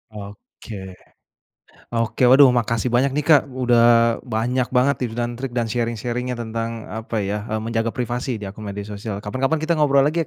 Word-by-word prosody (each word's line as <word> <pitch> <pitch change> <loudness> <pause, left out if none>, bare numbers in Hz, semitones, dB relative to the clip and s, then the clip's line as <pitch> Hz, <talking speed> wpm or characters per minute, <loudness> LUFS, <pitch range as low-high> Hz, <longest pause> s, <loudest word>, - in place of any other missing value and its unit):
Oke, 105 +2 -11 1.2
oke 115 +2 -1
waduh 135 0 +8
makasih 115 +1 -1
banyak 135 +2 +2
nih 150 - 0
Kak 145 -3 +7 0.2
udah 120 -1 +4 0.5
banyak 120 +2 0
banget 130 +2 +3
tips 120 -3 -3
dan 120 0 -1
trik 135 -2 -4
dan 115 -1 0
sharing-sharing-nya 120 +1 -2
tentang 115 0 -4 0.2
apa 115 +1 -6
ya, 105 - -1
eee, 110 0 -2
menjaga 115 0 -1
privasi 125 0 -2
di 105 - -7
akun 105 0 -9
media 100 0 -5
sosial 105 0 -5
kapan-kapan 135 +8 -1
kita 170 +1 +1
ngobrol 140 -2 +4
lagi 165 +3 +1
120 Hz, 170 wpm, -21 LUFS, 110-130 Hz, 1.2 s, waduh